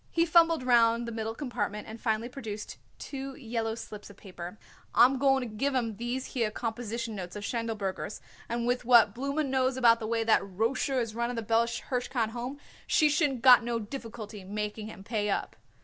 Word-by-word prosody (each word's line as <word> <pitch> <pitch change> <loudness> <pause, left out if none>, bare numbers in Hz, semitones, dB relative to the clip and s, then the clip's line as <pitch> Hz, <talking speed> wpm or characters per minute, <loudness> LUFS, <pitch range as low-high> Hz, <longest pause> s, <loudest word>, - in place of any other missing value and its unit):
He 335 0 +2
fumbled 330 -3 +4
round 235 -1 +4
the - - -4
middle 225 0 -3
compartment 210 -6 -3
and 220 +1 -9
finally 225 0 0
produced 220 -5 -7 0.2
two 270 -1 -6
yellow 225 -3 -3
slips 210 -2 -9
of 200 - -14
paper. 180 0 -9 0.4
"I'm 255 +2 +6
going 270 0 +4
to 215 - -10
give 275 +5 0
'em 230 -5 -1
these 240 +3 -3
here 230 -4 +1
composition 230 0 -4
notes 185 -2 -6
of 205 - -6
Schindelberger's, 215 -4 -3 0.3
and 235 0 -1
with 245 +1 0
what 235 -4 +6
Blooma 280 +5 -1
knows 260 -1 +1
about 235 -2 +5
the 220 - -4
way 230 0 0
that 225 -1 +4
Rosher 225 +7 0
is 230 -3 -2
running 235 +2 -2
the 230 - -3
Bella 230 +2 +2
Hirshkind 240 -1 -2
Home 245 +4 -5 0.3
she 305 -2 +4
shouldn't 290 -5 +1
got 250 -2 +8
no 235 0 -1
difficulty 220 -3 -7
making 210 +2 -4
him 195 -3 -10
pay 210 -1 -1
up." - - -2
230 Hz, 190 wpm, -29 LUFS, 215-255 Hz, 0.4 s, got